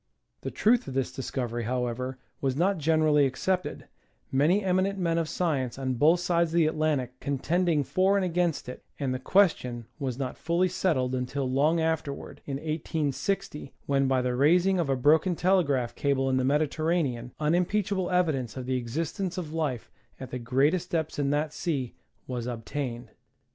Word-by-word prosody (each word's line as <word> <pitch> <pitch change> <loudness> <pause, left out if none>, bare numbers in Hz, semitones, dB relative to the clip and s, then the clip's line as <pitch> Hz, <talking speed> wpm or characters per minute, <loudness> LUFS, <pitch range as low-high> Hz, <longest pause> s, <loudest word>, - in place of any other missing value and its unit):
The - - -4
truth 240 +3 +2
of 130 - -6
this 135 -2 0
discovery, 120 -3 -3
however, 125 +1 -2 0.2
was 135 -2 0
not 180 +4 +1
generally 155 -2 +3
accepted, 185 +8 -2 0.5
many 160 +10 +3
eminent 190 +1 +1
men 170 -3 +1
of 160 -2 -2
science 135 -9 -1
on 130 -1 -1
both 155 +8 +4
sides 170 -1 +2
of 165 - -4
the 170 -2 +5
Atlantic 150 -5 -1
contending 155 +3 +1
for 190 +7 +2
and 195 - +1
against 175 -4 0
it, 125 - -8 0.2
and 135 -3 -1
the 130 - -3
question 125 - +2
was 130 -4 -3
not 130 -2 -4
finally 170 +3 +1
settled 155 -9 0
until 130 +2 -2
long 145 +6 +2
afterward, 160 -3 -3
in 140 - -2
1860, 155 +2 -3
when, 135 -1 +2
by 130 -1 +2
the 125 0 0
raising 175 +8 +3
of 165 -5 0
a 135 - +3
broken 155 +7 +3
telegraph 145 -10 +2
cable 135 0 0
in 130 - +2
the 130 - +1
Mediterranean, 145 -3 0
unimpeachable 180 +4 +1
evi 180 -3 +2
dence 130 -4 -4
of 130 - -5
the 130 0 0
existence 165 +10 -3
of 160 -4 -5
life 145 -8 -2 0.3
at 130 - -8
the 125 - -3
greatest 140 +9 +1
depths 160 -3 -2
in 140 -1 +1
that 150 +1 0
sea 145 -10 -2 0.3
was 125 -2 -4
obtained. 120 0 -5
150 Hz, 170 wpm, -28 LUFS, 130-170 Hz, 0.5 s, the